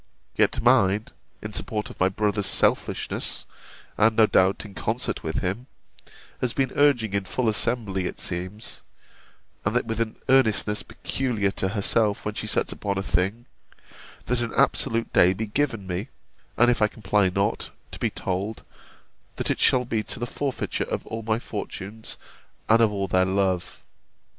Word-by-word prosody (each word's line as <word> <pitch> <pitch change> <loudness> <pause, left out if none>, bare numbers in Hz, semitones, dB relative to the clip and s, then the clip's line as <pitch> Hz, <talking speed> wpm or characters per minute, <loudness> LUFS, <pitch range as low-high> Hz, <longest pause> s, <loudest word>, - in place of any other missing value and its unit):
Yet - - +2
mine, 100 +3 +4 0.3
in - - -6
support 105 -1 -2
of - - -14
my 95 - +4
brother's 105 0 0
selfishness, - - 0 0.5
and, 110 +1 +5
no 110 - +6
doubt, 95 0 +2
in 100 - -10
concert 90 - -2
with - - -2
him, 100 +8 -2 0.7
has 125 -2 -1
been 135 -2 0
urging 125 -8 +3
in 100 -1 0
full 125 +4 -1
assembly 105 -4 0
it - - -7
seems, 95 +5 -5 0.8
(and 100 +4 -1
that 125 - +2
with 115 0 -3
an 110 -1 -2
earnestness 110 -5 +3
peculiar 115 -7 -2
to 95 - -1
herself 105 +1 +1
when 105 - -2
she 110 - -4
sets - - 0
upon 100 -1 -3
any 95 - -1
thing,) 95 +8 0 0.8
that 125 0 0
an 115 - -3
absolute 115 0 +1
day 90 +1 +6
be 110 +4 -3
given 115 -2 -1
me; 95 +5 -3 0.5
and 120 +1 +6
if 120 - 0
I 105 - +5
comply 105 -2 +1
not, 100 +3 -1 0.2
to - - -7
be - - +1
told, 100 +4 -3 0.7
that - - -1
it - - -1
shall 125 -1 +4
be 115 -2 -1
to - - -4
the 120 - -1
forfeiture 135 +2 -2
of - - -4
all 115 0 -5
my 110 0 0
fortunes, 110 -1 -7 0.5
and 115 +1 +5
of 110 -2 +4
all 100 -1 -2
their 95 0 +3
love. 95 -1 -1
105 Hz, 165 wpm, -25 LUFS, 95-115 Hz, 0.8 s, no